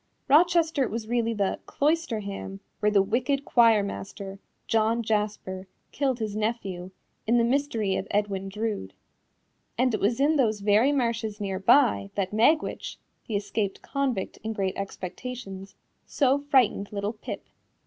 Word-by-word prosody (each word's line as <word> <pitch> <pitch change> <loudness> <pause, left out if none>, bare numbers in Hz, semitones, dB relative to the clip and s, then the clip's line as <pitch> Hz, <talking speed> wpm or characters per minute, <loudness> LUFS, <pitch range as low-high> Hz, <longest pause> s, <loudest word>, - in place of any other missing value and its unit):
Rochester 320 -1 +4
was 220 0 -4
really 230 -1 0
the 200 -2 0
"Cloisterham" 220 -11 -1 0.2
where 210 - +3
the 200 -2 +4
wicked 255 +7 0
choir 230 -4 +5
master, 195 0 -6 0.3
John 225 +1 +1
Jasper, 210 -3 -2 0.2
killed 270 -3 0
his 215 -3 -3
nephew, 205 -5 -3 0.4
in 235 +2 +4
The 235 - +4
Mystery 235 -6 0
of - - -4
Edwin 200 -2 -1
Drood. 210 - -4 0.8
And 250 0 +2
it 215 - 0
was 230 +5 +1
in 300 +3 +3
those 220 -6 +1
very 215 +7 +4
marshes 230 -5 -1
near 195 -2 -2
by, 190 - +4
that 195 0 -1
Magwitch, 270 +9 +1 0.3
the 220 - -3
escaped 200 0 -2
convict 265 -8 -2
in 220 0 -2
Great 195 -3 -1
Expectations, 195 +1 -6 0.3
so 275 -1 +2
frightened 260 -8 +2
little 205 +1 -2
Pip. 215 - -7
220 Hz, 140 wpm, -27 LUFS, 200-250 Hz, 0.8 s, choir